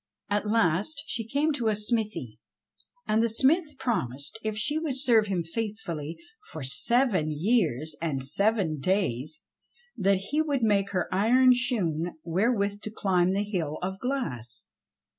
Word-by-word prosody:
At 205 +1 0
last 210 - +1
she 225 -2 -3
came 290 +6 +1
to 245 -5 -2
a 215 - +2
smithy; 210 - -1 0.7
and 215 +1 +2
the 230 - +2
smith 295 +6 +2
promised 145 - -2
if 215 -1 -2
she 295 +8 +1
would 300 -5 -2
serve 235 -6 +4
him 185 -4 -1
faithfully 170 -5 -4 0.3
for 155 - -6
seven 200 - +2
years 155 - 0
and 145 -6 -2
seven 195 0 +1
days, 155 - -1 0.5
that 195 0 +2
he 200 +12 -1
would 285 -5 -1
make 200 -2 +2
her 185 -3 -1
iron 250 +6 +5
shoon 175 -10 -1
wherewith 200 +3 0
to 215 - -5
climb 185 -4 +1
the 200 +1 0
hill 170 -7 -3
of 190 +1 -3
glass. 125 - -3
205 Hz, 145 wpm, -27 LUFS, 165-235 Hz, 0.7 s, iron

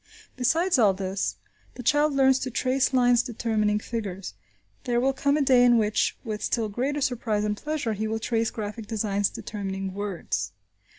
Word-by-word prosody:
Besides 325 +6 +2
all 205 -5 +5
this, 190 0 -2 0.4
the 250 - -7
child 295 +2 +3
learns 265 -1 +4
to 265 - -3
trace 255 +2 +1
lines 245 -2 +4
determining 220 -3 0
figures. 205 -4 -5 0.5
There 240 -1 +1
will 270 +2 +2
come 280 +2 +1
a 300 - +2
day 255 -2 +5
in 240 -1 +6
which, 215 -1 +1
with 215 -4 -4
still 225 -3 0
greater 270 +7 -2
surprise 235 -6 0
and 210 0 0
pleasure, 295 -2 -2
he 215 +1 -2
will 220 +1 -1
trace 225 0 0
graphic 215 0 -6
signs 205 -2 0
determining 195 -2 -5
words. 180 - -3
225 Hz, 170 wpm, -26 LUFS, 210-260 Hz, 0.5 s, in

